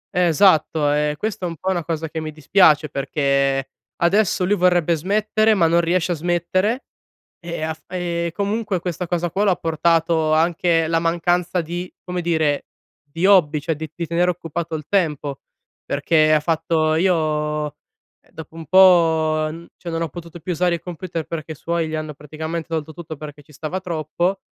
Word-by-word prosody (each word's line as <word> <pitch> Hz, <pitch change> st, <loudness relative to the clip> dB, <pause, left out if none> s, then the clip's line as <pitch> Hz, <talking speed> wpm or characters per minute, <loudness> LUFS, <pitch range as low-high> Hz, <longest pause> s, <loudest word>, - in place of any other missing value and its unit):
Eh, 180 Hz, 0 st, +3 dB
esatto. 155 Hz, -4 st, +3 dB
E 150 Hz, 0 st, 0 dB
questa 205 Hz, -1 st, -3 dB
è -, -, -3 dB
un 165 Hz, -, -6 dB
po' 190 Hz, 0 st, -1 dB
una 175 Hz, -3 st, -1 dB
cosa 160 Hz, -1 st, -3 dB
che 160 Hz, -, -5 dB
mi 155 Hz, 0 st, -5 dB
dispiace, 155 Hz, -1 st, +4 dB
perché, 140 Hz, -1 st, 0 dB, 0.3 s
adesso 185 Hz, 0 st, +2 dB
lui 200 Hz, -, +2 dB
vorrebbe 175 Hz, -3 st, +3 dB
smettere 215 Hz, +5 st, +2 dB
ma 175 Hz, -4 st, +3 dB
non 170 Hz, +1 st, +4 dB
riesce 175 Hz, +1 st, 0 dB
a -, -, +1 dB
smettere. 175 Hz, -, 0 dB, 0.6 s
E 170 Hz, -2 st, -5 dB
af 160 Hz, 0 st, -4 dB
e 170 Hz, -2 st, -2 dB
comunque, 205 Hz, -1 st, -1 dB
questa 175 Hz, 0 st, -4 dB
cosa 175 Hz, 0 st, -1 dB
qua 195 Hz, +5 st, 0 dB
l'ha 195 Hz, -3 st, +3 dB
portato 165 Hz, -1 st, +1 dB
anche 165 Hz, 0 st, +2 dB
la 165 Hz, 0 st, +1 dB
mancanza 175 Hz, +2 st, 0 dB
di, 175 Hz, +2 st, -4 dB
come 180 Hz, -1 st, -4 dB
dire, 160 Hz, -4 st, 0 dB, 0.4 s
di 165 Hz, +5 st, -3 dB
hobby, 165 Hz, -7 st, +5 dB
cioè 160 Hz, +2 st, -2 dB
di 155 Hz, 0 st, -7 dB
di 170 Hz, -2 st, -4 dB
tenere 175 Hz, +1 st, +1 dB
occupato 170 Hz, -1 st, -4 dB
il 150 Hz, -2 st, -6 dB
tempo. 150 Hz, -7 st, -1 dB, 0.4 s
Perché 155 Hz, +2 st, +2 dB
ha 155 Hz, -, +5 dB
fatto: 160 Hz, 0 st, +1 dB
"Io, 155 Hz, -3 st, +1 dB
ehm, 150 Hz, -, -6 dB, 0.6 s
dopo 160 Hz, 0 st, -11 dB
un 165 Hz, -1 st, -8 dB
po', 160 Hz, -3 st, +5 dB
n 170 Hz, +2 st, -10 dB
cioè 175 Hz, -, -8 dB
non 165 Hz, 0 st, -2 dB
ho 165 Hz, -, 0 dB
potuto 170 Hz, +2 st, -10 dB
più 180 Hz, +3 st, -3 dB
usare 175 Hz, +1 st, +1 dB
il 170 Hz, -, -8 dB
computer." 170 Hz, -2 st, -5 dB
Perché 160 Hz, -1 st, -5 dB
i -, -, -13 dB
suoi 165 Hz, +1 st, -2 dB
gli 155 Hz, -, -3 dB
hanno 155 Hz, -1 st, -4 dB
praticamente 160 Hz, +3 st, -6 dB
tolto 160 Hz, -1 st, -3 dB
tutto, 160 Hz, -1 st, -8 dB
perché 150 Hz, 0 st, -9 dB
ci 145 Hz, -, -21 dB
stava 160 Hz, +6 st, -5 dB
troppo. 175 Hz, +2 st, -2 dB
165 Hz, 185 wpm, -21 LUFS, 155-180 Hz, 0.6 s, hobby